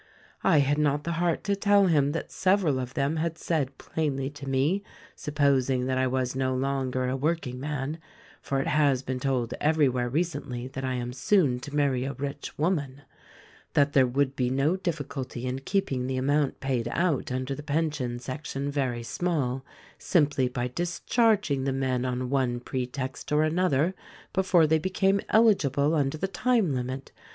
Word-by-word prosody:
"I 150 - +5
had 145 +2 +1
not 145 0 +1
the 170 - -2
heart 170 -2 +1
to 200 0 +1
tell 200 0 +4
him 145 -5 +3
that 165 - -4
several 185 -8 +2
of 125 0 -5
them 140 +3 0
had 165 0 -1
said 140 -5 -1
plainly 140 -3 -2
to 145 -1 -8
me 140 +9 +1 0.2
— - - -23
supposing 140 -4 +1
that 130 0 0
I 130 - +2
was 130 0 -1
no 130 -1 0
longer 130 -1 -1
a 130 - -1
work 160 +5 0
ing 125 0 -6
man 145 +2 -3 0.2
— - - -25
for 135 - -1
it 135 - -1
has 145 -5 +2
been 130 -1 -3
told 125 -3 -1
everywhere 140 -6 +2
recently 140 -5 -2
that 135 0 -6
I 130 -1 -1
am 120 0 -3
soon 140 -5 +2
to 145 +3 -7
marry 140 -4 +2
a 135 +1 -3
rich 140 0 -6
woman 145 -4 -1 0.3
— - - -25
that 145 0 +3
there 130 -2 +5
would 135 +2 0
be 125 -1 0
no 135 +6 +2
diffi 170 -6 -3
culty' 130 -3 -6
in 130 +1 -2
keeping 135 -5 -1
the 130 0 -2
amount 140 +2 +1
paid 130 -4 -1
out 160 0 0
under 130 +2 -2
the 140 - -6
pension 145 -5 -1
sec 130 +4 -6
tion 140 +1 -3
very 130 -4 -1
small, 135 -3 -1 0.4
simply 145 -6 +2
by 125 0 -2
discharging 175 - +1
the 135 - 0
men 130 -1 0
on 125 0 -2
one 130 -3 +1
pre 125 0 -3
text 130 +1 -6
or 150 +1 +4
another 165 0 +2 0.4
before 185 -3 +4
they 160 +1 +3
became 190 +3 +1
eligible 155 - +3
under 145 -1 +1
the 190 - -1
time 210 - +1
limit. 130 +1 -4
140 Hz, 185 wpm, -27 LUFS, 130-155 Hz, 0.4 s, I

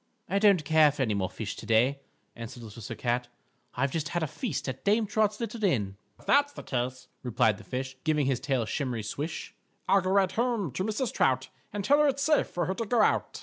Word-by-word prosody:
"I 200 - +1
don't 200 -7 +4
care 155 -1 +5
for 140 -1 -1
any 110 -4 0
more 95 -2 -1
fish 105 -2 -5
to - - -8
day," 120 +5 +3 0.4
answered 115 +1 -8
Little 110 +1 -10
Sir 115 +2 -6
Cat, 120 +2 -1 0.5
"I've 135 +2 0
just 155 -1 -2
had 175 +1 -1
a - - 0
feast 200 - -4
at 130 -1 -5
Dame 215 +2 +3
Trot's 210 0 +1
little 230 -1 -4
Inn." 105 - +1 0.2
"_If - - -19
that's 285 +1 +3
the - - -9
case," 125 0 -3
replied 110 -3 +1
the - - -12
fish, 130 +4 -4
Giving 155 -3 +2
his 130 -2 +1
tail 135 -4 0
a - - -7
shimmery 125 -3 -2
swish, 145 +10 -5 0.3
"I'll 195 +1 +5
go 185 - -2
right 190 -1 +3
home 230 - 0
to 185 - -2
Mrs. 220 +4 -2
Trout 130 0 +1 0.2
And 205 -1 -4
tell 285 +6 +5
her 300 - +5
it's 275 0 0
safe 305 +1 +3
for 175 -1 -2
her 190 - -1
to 230 +4 -3
go 240 +2 +2
out. - - +1
150 Hz, 235 wpm, -28 LUFS, 125-205 Hz, 0.5 s, care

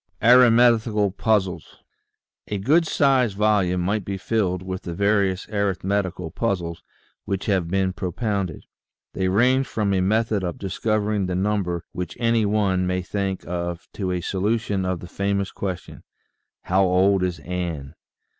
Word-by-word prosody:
ARITHMETICAL 115 -4 +5
PUZZLES 100 -3 -1 0.9
GOOD 160 +7 +3
SIZED 130 -10 +2
volume 100 -4 +2
might 100 +3 0
be 100 +1 -4
filled 95 -3 -1
with 95 0 -5
the 85 - -6
various 100 -1 +1
arithmetical 95 -4 -1
puzzles 85 -7 -2 0.4
which 95 -1 -3
have 95 -5 +1
been 95 0 0
propounded. 95 -1 -3 0.5
They 95 -1 -1
range 125 +7 +3
from 105 -3 -1
a 95 - +2
method 110 +1 +1
of 90 -2 -3
discovering 105 0 -1
the 90 - -2
number 95 -3 -1
which 90 -2 -5
any 115 -2 +2
one 95 -3 +1
may 90 0 -1
think 95 0 -3
of 85 -1 -4
to 95 -3 -3
a 90 -1 -1
solution 100 +1 -1
of 90 -1 -2
the 90 - -8
"famous" 100 +1 -1
question: 95 -3 -6 0.6
"How 95 +2 +2
old 95 +1 +3
is 90 -2 -1
Ann? 85 -6 -5
95 Hz, 140 wpm, -23 LUFS, 90-105 Hz, 0.9 s, ARITHMETICAL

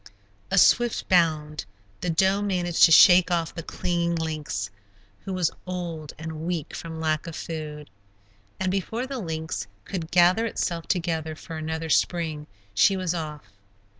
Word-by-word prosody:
A - - 0
swift 240 -1 +4
bound. 155 - +2 0.3
The 175 - -3
doe 190 +4 +2
managed 180 -4 +3
to - - +3
shake 180 +2 +8
off 170 -2 0
the 165 - -5
clinging 170 +1 -1
lynx, 150 - -3 0.5
who 195 - -4
was 180 -3 +1 0.2
old 170 -4 -5
and 160 0 -6
weak 165 -4 -3
from 160 -1 -7
lack 155 -1 -1
of 165 - -6
food. 150 -2 -6 0.7
And 190 -1 0
before 220 +6 -2
the 265 -1 -5
lynx 160 - -4 0.2
could 170 -5 -5
gather 180 +6 +4
itself 170 -6 -3
together 165 -3 -1
for 160 +1 -9
another 160 +1 -4
spring, 160 -4 0 0.3
she 105 - +4
was 185 -2 -1
off. 155 -4 -5
165 Hz, 150 wpm, -25 LUFS, 155-180 Hz, 0.7 s, shake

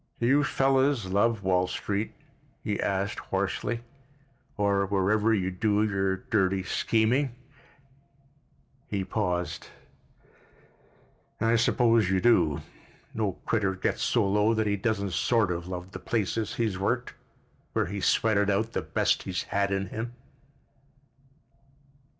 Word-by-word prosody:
"Do 120 - 0
you 140 +4 +4
fellows 135 -3 +2
love 100 +3 +1
Wall 90 -1 +2
Street?" 105 +3 -3 0.5
he 105 - -1
said 100 +1 -1
hoarsely, 120 0 -2 0.8
"or 100 -1 +2
wherever 105 +3 +2
you 95 -4 +1
do 105 +3 +1
your 95 -2 0
dirty 95 -2 0
scheming——" 120 +7 +1 1.5
He 100 -2 -2
paused. 90 -4 -2 1.7
"I 115 +1 +3
suppose 115 -3 +3
you 95 -1 +2
do. 80 -10 +3 0.5
No 105 -4 -1
critter 100 -4 +1
gets - - -1
so - - +2
low 105 +3 +2
that 110 0 +1
he 100 -1 +1
doesn't 100 -2 -1
sort 110 +3 +2
of 85 0 -4
love 90 0 -6
the - - -7
place 110 -5 -1 0.2
he's 110 -5 -1
worked, 120 +5 -1 0.6
where - - +1
he's 100 +3 -2
sweated 105 -2 +2
out 110 +3 0
the - - -1
best - - +1
he's - - -3
had 100 0 +2
in 95 -1 -1
him." 115 +3 -5
100 Hz, 125 wpm, -27 LUFS, 95-115 Hz, 1.7 s, you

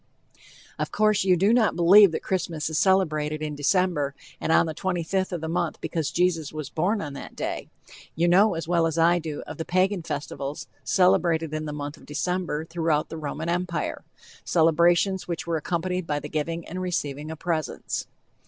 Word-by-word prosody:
Of - - -2
course, 215 -2 +2
you 185 -2 +4
do 200 +6 +3
not 235 -3 +3
believe 185 +3 +7
that - - -4
Christmas 165 -4 -2
is 155 - +1
celebrated 155 -5 +1
in 150 -1 -3
December 145 -1 +1 0.2
and - - -1
on - - +5
the 160 - -4
25th 185 +2 -1
of 175 -3 -3
the 160 - -3
month 170 0 -1
because 160 -4 -2
Jesus 170 -4 0
was 155 -2 -6
born 200 +6 0
on 145 -3 -6
that 140 - -9
day. - - -4 0.5
You 170 +3 +2
know 190 +3 +5
as 165 -1 -4
well 170 -1 +2
as 160 0 -3
I 170 +1 +4
do 155 -3 -5
of 155 - -8
the 160 - -3
Pagan 185 +2 +1
festivals 145 -2 -5 0.2
celebrated 165 -4 +2
in 155 0 -3
the 150 - -4
month 145 0 -5
of - - -17
December 160 +1 -2
throughout 165 -2 0
the 160 - -6
Roman 155 +1 -4
Empire 175 0 -2 0.4
celebrations 170 +3 +3
which 170 -2 -4
were 170 -1 0
accompanied 180 +2 -2
with 145 -1 -1
the 150 - -6
giving 165 +2 -3
and 185 +2 -5
receiving 150 -5 -3
of 160 - -6
presents. 160 -2 -3
165 Hz, 190 wpm, -25 LUFS, 155-180 Hz, 0.5 s, believe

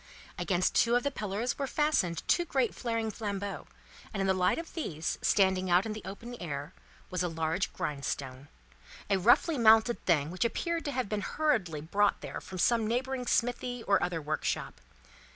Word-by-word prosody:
Against 185 -2 +1
two 235 +1 +4
of 245 - +2
the 285 - 0
pillars 215 +2 -3
were 275 - -1
fastened 255 - 0
two 345 - +3
great 265 -8 0
flaring 230 -2 -2
flambeaux, 200 -2 -4 0.4
and 210 - -4
in 195 - +1
the 190 - +3
light 185 -1 +2
of 330 -1 -6
these, 165 - -3
standing 190 -2 +3
out 180 +3 +4
in 220 - -3
the 215 - -7
open 230 +5 -7
air, 145 0 -5 0.4
was 180 -1 -1
a 180 - +1
large 165 +3 -1
grindstone: 140 -2 -4 0.6
a 195 - +3
roughly 245 - +4
mounted 225 +1 +5
thing 155 -3 +2
which 185 - -1
appeared 335 +8 -1
to 290 - -1
have 255 -6 -2
hurriedly 205 - 0
been - - -10
brought 205 0 +2
there - - -6
from 185 - -8
some 225 +4 +2
neighbouring 250 +2 -2
smithy, 245 0 0
or 200 - +3
other 165 -1 -2
workshop. 150 - -2
205 Hz, 180 wpm, -30 LUFS, 175-245 Hz, 0.6 s, mounted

